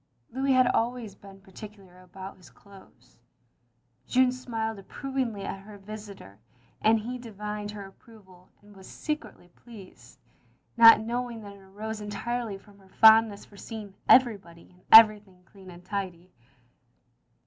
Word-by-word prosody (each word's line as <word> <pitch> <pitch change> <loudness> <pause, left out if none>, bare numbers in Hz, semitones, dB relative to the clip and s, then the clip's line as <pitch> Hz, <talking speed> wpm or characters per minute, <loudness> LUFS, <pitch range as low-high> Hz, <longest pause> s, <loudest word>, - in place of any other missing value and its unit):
Louis 265 +2 0
had 255 0 +4
always 235 -3 -2
been 195 -1 -16
particular 195 -1 -14
about 190 +1 -11
his 180 - -18
clothes. 190 - -20 0.9
Jeanne 255 0 +3
smiled 225 -4 -5
approvingly 245 0 -5
at 195 - -6
her 205 +1 -13
visitor, 200 - -11 0.4
and 220 +1 +3
he 245 +4 -6
divined 210 -2 -7
her 205 -1 -8
approval 195 -3 -19
and 205 0 -18
was 190 -1 -14
secretly 300 - -6
pleased, 205 0 -16 0.6
not 230 -2 +8
knowing 235 0 -5
that 200 -1 -10
it - - -17
arose 210 +3 -8
entirely 210 +1 -4
from 200 0 -21
her 190 -1 -22
fond 220 +2 +6
ness 200 -1 -12
for 200 - -19
seeing 210 -2 -9 0.2
everybody 200 -11 +2
and 180 0 -25
everything 210 -4 +6
clean 190 -2 -16
and 175 0 -14
tidy. 185 -3 -6
210 Hz, 140 wpm, -27 LUFS, 195-225 Hz, 0.9 s, not